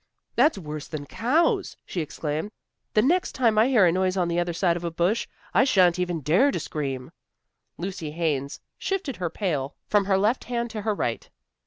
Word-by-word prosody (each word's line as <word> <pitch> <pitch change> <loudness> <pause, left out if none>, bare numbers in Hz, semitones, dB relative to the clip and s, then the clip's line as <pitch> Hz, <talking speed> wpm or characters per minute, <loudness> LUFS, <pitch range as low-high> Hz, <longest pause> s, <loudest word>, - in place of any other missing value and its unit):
"That's 275 +1 +4
worse 155 -4 -6
than 150 -3 -6
cows!" 265 - +1
she 175 - -3
exclaimed. 155 +4 -3 0.5
"The 215 - +5
next 345 +8 +2
time 230 -4 +3
I 225 - +5
hear 240 -8 +5
a 170 - +5
noise 185 +1 +1
on 175 -2 +1
the 170 0 +1
other 175 0 0
side 170 0 +1
of 175 - -5
a 170 - -1
bush, 175 +7 0 0.3
I 245 - +5
shan't 185 -9 +4
even 175 -3 -1
dare 175 - +4
to - - -1
scream." 135 -4 -4 0.7
Lucy 175 -3 -4
Haines 150 -4 -2 0.2
shifted 380 - -2
her 180 -2 -2
pail 155 -7 -2
from 205 -2 +2
her 195 -1 +3
left 215 +6 +1
hand 235 -1 -2
to 215 - -4
her 215 0 0
right. 120 -11 -2
185 Hz, 195 wpm, -25 LUFS, 160-225 Hz, 0.7 s, The